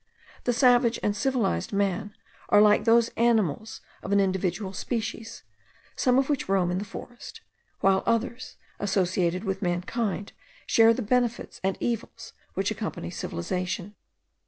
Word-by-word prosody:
The 245 - +3
savage 245 -1 +4
and 205 - +1
civilized 240 - 0
man 200 +1 -1 0.3
are 205 - +6
like 210 0 +5
those 230 0 +5
animals 220 -3 +1 0.2
of 195 - -6
an 200 - +4
individual 190 0 -1
species, 225 +1 -4 0.5
some 250 -2 +2
of 270 0 +2
which 285 -9 -1
roam 185 -2 +2
in 180 - -1
the 205 - -5
forest, 240 +4 -10 0.4
while 190 0 +4
others, 235 +2 -1 0.2
associated 185 -2 0
with 195 -2 -3
mankind, 195 +3 -2 0.3
share 225 0 +5
the 250 - -3
benefits 240 +1 -1
and 190 -1 0
evils 235 -2 -4 0.2
which - - 0
accompany - - -4
civilization. 180 - -4
205 Hz, 135 wpm, -26 LUFS, 190-235 Hz, 0.5 s, are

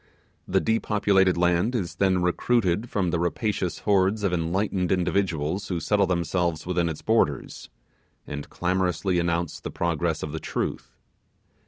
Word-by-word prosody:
The - - +2
depopulated 100 -4 +2
land 90 +7 +2
is 95 -8 -3
then 95 -2 +2
recruited 105 +3 +1
from 95 -4 0
the 85 - 0
rapacious, 90 +2 -1
hordes 100 +1 +2
of 95 -3 +1
enlightened 90 +2 0
individuals 90 -1 0
who 90 -3 -2
settle 100 +3 +2
themselves 85 -2 -1
within 85 -1 0
its 80 - -6
borders, 110 - 0 0.6
and 75 -1 -6
clamorously 90 0 0
announce 85 -1 -1
the - - -6
progress 85 -1 -1
of 75 - -4
the 80 - -4
Truth. - - -4
90 Hz, 140 wpm, -25 LUFS, 85-100 Hz, 0.6 s, The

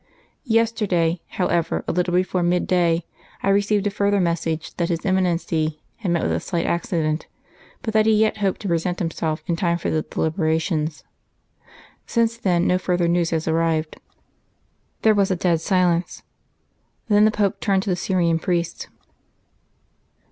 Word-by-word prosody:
Yesterday, 210 -7 +1
however, 170 -3 -1
a - - +1
little 180 0 0
before 185 0 +1
mid 175 +1 +1
day, 170 -2 +1 0.4
I - - +2
received 205 +1 +2
a 205 - +1
further 200 0 +1
message 165 -2 -1
that 170 -1 0
his 165 -2 -2
Eminency 170 -4 0 0.2
had 205 -5 -3
met 170 -1 +1
with - - 0
a - - 0
slight 170 -3 -2
accident, 165 -2 -1 0.6
but 220 -3 -3
that 215 0 +3
he 220 - +5
yet 215 0 +2
hoped 195 -3 -1
to 205 - -4
present 175 +1 0
himself 165 -2 -2
in 170 - 0
time 170 0 0
for 170 - -3
the 155 - +1
deliberations. 160 -1 -1 1.0
Since 230 -1 +1
then 175 -5 +1
no 180 - +2
further 180 -2 0
news 170 -1 +1
has 160 -1 -2
arrived." 160 -1 0 1.1
There 220 - +6
was 200 -2 +2
a 185 - +1
dead 170 -2 +1
silence. 175 -1 +1 0.8
Then 210 -1 +5
the - - +5
Pope 210 -2 0
turned 195 -2 +1
to 200 - -1
the - - +2
Syrian 175 -2 +1
priest. 170 0 -2
175 Hz, 160 wpm, -22 LUFS, 165-195 Hz, 1.1 s, There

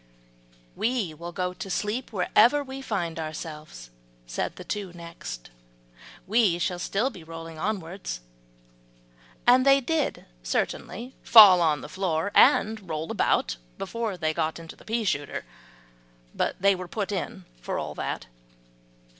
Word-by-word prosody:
"We 230 -8 0
will 170 +3 -8
go 180 0 -2
to 185 +2 -7
sleep 210 +7 -2
wherever 235 +8 +4
we 265 0 -7
find 175 -10 -2
ourselves," 155 - -7 0.3
said - - -3
the - - -9
two 200 -3 -4
next, 170 - -8 0.7
"we 210 -4 +3
shall 175 +1 -1
still 210 +8 0
be 175 - -11
rolling 165 0 -9
onwards;" 185 - -3 1.3
and 250 +1 +6
they 275 0 +6
did 305 +3 -1 0.2
certainly 200 - -3
fall 205 -6 +9
on 155 -3 +2
the - - -7
floor, 185 0 -1
and 215 -3 +4
roll 155 0 -3
about - - +1 0.2
before 230 -5 -3
they 160 -2 0
got 155 0 -1
into 165 -1 -10
the - - -18
pea 225 +1 -1
shooter; 145 -8 -2 0.9
but - - -1
they 200 +1 +5
were 185 -1 -6
put 205 +2 -3
in 180 - -4 0.2
for - - -3
all - - -4
that. - - -4
185 Hz, 140 wpm, -26 LUFS, 160-220 Hz, 1.3 s, fall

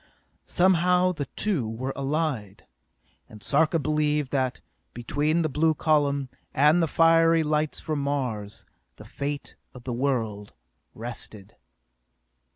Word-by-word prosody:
Somehow 180 0 +3
the 150 -5 -4
two 165 - 0
were 130 +4 -4
allied, 135 -8 -2 0.6
and 105 -2 -13
Sarka 155 - +2
believed 150 -1 0
that, 130 -3 -1 0.4
between 150 +7 0
the - - +1
blue 155 +2 +1
column, 145 -3 +1 0.3
and 150 +5 +5
the 165 - +2
fiery 165 +1 +4
lights 155 0 0
from 155 -2 -3
Mars, 125 -8 -3 0.3
the - - -13
fate 140 0 -5 0.2
of 125 - -11
the 125 - -4
world 115 -6 -2 0.4
rested. 110 -3 -8
145 Hz, 120 wpm, -26 LUFS, 125-160 Hz, 0.6 s, and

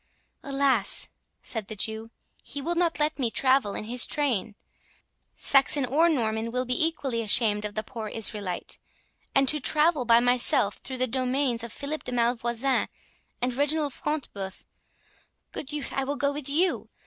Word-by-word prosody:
"Alas!" 275 -6 +2 0.3
said 220 -4 -2
the 215 - -5
Jew, 220 +2 -4 0.3
"he 285 - -6
will 325 +5 -1
not 340 -2 +1
let 300 0 0
me 245 -4 +1
travel 260 -3 +2
in - - -4
his 235 +2 +1
train—Saxon 270 +2 -1
or 315 +7 +3
Norman 225 -6 -1
will 250 +1 -1
be 250 +5 +2
equally 270 -7 -3
ashamed 210 -1 +4
of 205 - -5
the 215 - -2
poor 225 -2 -7
Israelite; 205 -4 -4 0.6
and 275 0 +4
to 300 +3 +4
travel 300 +1 +3
by 230 -1 +6
myself 240 -4 +3
through 260 - -6
the 255 - +2
domains 255 0 0
of 235 - -6
Philip 295 +5 -5
de 250 - -5
Malvoisin 240 +2 +1 0.6
and 250 0 +1
Reginald 290 +1 +1
Front 300 -2 -3
de 200 - -9
Bœuf—Good 195 +7 -11
youth, 295 -1 -3
I 270 - 0
will 280 +2 -2
go 280 0 0
with 285 -1 -4
you! 345 +6 +1
255 Hz, 160 wpm, -27 LUFS, 225-285 Hz, 0.6 s, by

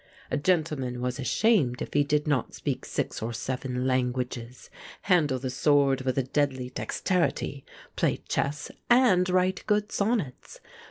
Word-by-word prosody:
A - - +1
gentleman 145 -6 0
was 125 +1 -2
ashamed 140 - +2
if - - -5
he 145 - +4
did 150 +1 0
not 145 -6 0
speak - - -3
six - - -3
or 115 +2 -3
seven 125 +1 -3
languages, 125 -1 -2 0.3
handle 160 -9 +3
the 130 0 -4
sword 140 -1 +3
with 130 0 -1
a 135 - +2
deadly 130 -1 -1
dexterity, 165 -3 -1 0.3
play - - +1
chess, 145 +2 -2 0.2
and 215 -8 +5
write 185 +1 +1
good 210 0 +1
sonnets. 200 - -2
140 Hz, 145 wpm, -27 LUFS, 125-180 Hz, 0.3 s, and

